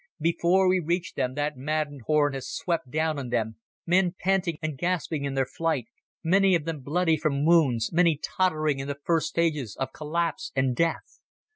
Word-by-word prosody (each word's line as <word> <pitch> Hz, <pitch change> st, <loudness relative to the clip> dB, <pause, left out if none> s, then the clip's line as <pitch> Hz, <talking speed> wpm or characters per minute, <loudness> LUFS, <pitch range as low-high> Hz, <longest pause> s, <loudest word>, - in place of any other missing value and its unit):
Before 170 Hz, +4 st, +2 dB
we 185 Hz, 0 st, +3 dB
reached 175 Hz, +1 st, -2 dB
them 130 Hz, 0 st, -1 dB
that 145 Hz, 0 st, -1 dB
maddened 145 Hz, 0 st, -2 dB
horde 150 Hz, -2 st, +3 dB
had 135 Hz, -1 st, -5 dB
swept 165 Hz, -6 st, -2 dB
down 155 Hz, +1 st, 0 dB
on 130 Hz, -3 st, -5 dB
them, 110 Hz, -2 st, -1 dB, 0.3 s
men 180 Hz, 0 st, +2 dB
panting 185 Hz, -4 st, +1 dB
and 155 Hz, -2 st, -3 dB
gasping 165 Hz, -2 st, -1 dB
in 135 Hz, -1 st, -3 dB
their 135 Hz, -1 st, +2 dB
flight, 145 Hz, -1 st, -1 dB, 0.4 s
many 190 Hz, +2 st, +4 dB
of 160 Hz, -3 st, -1 dB
them 165 Hz, -2 st, -3 dB
bloody 160 Hz, +4 st, +1 dB
from 145 Hz, -2 st, 0 dB
wounds, 140 Hz, -9 st, +3 dB
many 170 Hz, -2 st, +4 dB
tottering 155 Hz, -7 st, 0 dB
in 135 Hz, -, -4 dB
the 140 Hz, -1 st, -4 dB
first 165 Hz, -2 st, +1 dB
stages 150 Hz, -10 st, -1 dB
of 135 Hz, -, -3 dB
collapse 165 Hz, +2 st, -2 dB
and 130 Hz, -2 st, +1 dB
death. 165 Hz, +4 st, -1 dB
155 Hz, 180 wpm, -26 LUFS, 140-170 Hz, 0.4 s, many